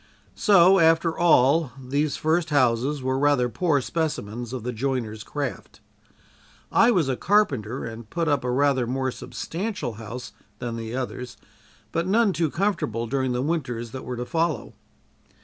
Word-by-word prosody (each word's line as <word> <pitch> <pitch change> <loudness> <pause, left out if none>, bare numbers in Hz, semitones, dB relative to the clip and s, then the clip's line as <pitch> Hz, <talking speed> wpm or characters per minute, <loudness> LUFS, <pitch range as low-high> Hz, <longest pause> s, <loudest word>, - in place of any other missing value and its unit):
So 190 -2 +5
after 165 0 +3
all, 155 -4 +4
these 140 +3 -1
first 160 +1 +1
houses 130 0 +1
were 130 +1 0
rather 145 -3 +3
poor 150 0 +1
specimens 120 -7 -3
of 130 -4 -5
the 125 +1 -3
joiner's 115 -3 -2
craft. 140 -1 -5 0.9
I 230 - +5
was 180 - +2
a 130 - 0
carpenter 135 - +1
and 115 -1 -8
put 170 -1 -1
up 145 -3 +1
a 125 - -2
rather 130 -1 +2
more 130 +1 -1
substantial 185 - -4
house 115 +2 -7 0.3
than 120 0 -4
the 115 +1 -5
others, 125 -1 -5 0.5
but 165 +2 -1
none 210 0 +3
too 165 -3 0
comfortable 165 - -1
during 130 +1 -1
the 125 +1 -1
winters 125 -7 -2
that 130 - -7
were 125 0 -5
to 125 - -3
follow. 165 +2 -1
135 Hz, 155 wpm, -24 LUFS, 125-165 Hz, 0.9 s, So